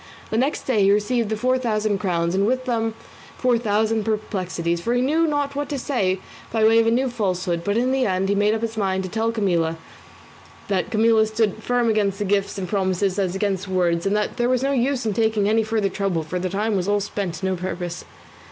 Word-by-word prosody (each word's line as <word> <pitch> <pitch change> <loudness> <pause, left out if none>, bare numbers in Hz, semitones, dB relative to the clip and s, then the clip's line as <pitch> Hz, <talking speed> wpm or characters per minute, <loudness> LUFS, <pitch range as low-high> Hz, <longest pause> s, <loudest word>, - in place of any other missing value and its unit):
The 220 - 0
next 275 +4 0
day 235 -6 +1
he 195 0 +5
received 210 +2 +1
the 220 - -1
four 255 +3 +1
thousand 215 -4 0
crowns, 170 -4 0
and 195 +2 +2
with 255 +2 0
them 225 -3 -1 0.4
four 245 -2 +2
thousand 220 0 +1
perplexities, 185 -6 -2
for 235 +6 0
he 245 - +2
knew 320 +5 +2
not 290 -2 -1
what 290 0 -3
to 290 - -2
say 200 -9 0 0.3
by 225 -1 +1
way 225 +1 +6
of 225 - +3
a - - +4
new 255 +3 +2
falsehood; 185 -7 -1
but 205 +4 0
in 250 +2 +1
the 265 -2 +1
end 190 0 0
he 200 - +2
made 205 +2 +2
up 220 - -3
his 225 -1 -3
mind 190 -2 0
to 185 - -5
tell 225 0 0
him 170 -7 0 0.9
that 195 +1 0
Camilla 220 -1 +4
stood 220 -1 +1
as - - -15
firm 245 -1 +1
against 205 -2 +1
gifts 200 0 0
and 190 -2 -3
promises 190 0 0
as 190 -2 0
against 195 -1 -1
words, 175 -1 +1
and 200 - +1
that 210 - -2
there 240 0 +1
was 255 0 +1
no 275 - +1
use 260 -1 0
in 215 - 0
taking 220 -1 +1
any 220 +1 +3
further 220 -2 0
trouble, 195 -4 -1
for 180 +4 -4
the 185 +1 -2
time 210 +3 -1
was 185 -1 -1
all 205 0 +2
spent 195 -3 -3
to 190 - -5
no 190 0 0
purpose. 180 -1 -5
210 Hz, 235 wpm, -22 LUFS, 190-230 Hz, 0.9 s, way